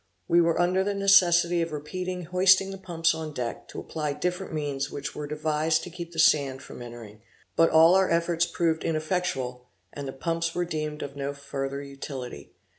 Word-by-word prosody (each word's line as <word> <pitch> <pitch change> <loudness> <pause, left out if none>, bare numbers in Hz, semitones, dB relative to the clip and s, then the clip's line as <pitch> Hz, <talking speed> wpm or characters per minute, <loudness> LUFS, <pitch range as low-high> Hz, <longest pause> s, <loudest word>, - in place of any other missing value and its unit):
We 170 +1 +5
were 170 0 +2
under 180 +2 +2
the 200 +1 -1
necessity 175 -3 +5
of 165 0 -2
repeatedly 180 +5 -4
hoisting 185 +3 +4
the 195 - -8
pumps 165 -3 +1
on 160 -2 -6
deck, 120 -2 -4
to - - -8
apply 150 -2 -3
different 180 +5 -3
means 145 -3 -2
which 140 0 -5
were 150 -1 -5
devised 155 +1 0
to 180 - -8
keep 170 0 -7
the 165 - -12
sand 140 -4 +3
from - - -10
entering, 115 -3 -10 0.3
but 165 0 +5
all 165 +2 +7
our 190 0 +4
efforts 170 0 +1
proved 165 -2 0
ineffectual, 155 -7 -2 0.3
and 140 -1 -6
the - - -3
pumps 165 +4 -2
were 175 - 0
deemed 155 -2 -4
of 140 0 -7
no 140 0 -4
further 140 0 -4
utility. 135 - -8
160 Hz, 190 wpm, -27 LUFS, 140-175 Hz, 0.3 s, all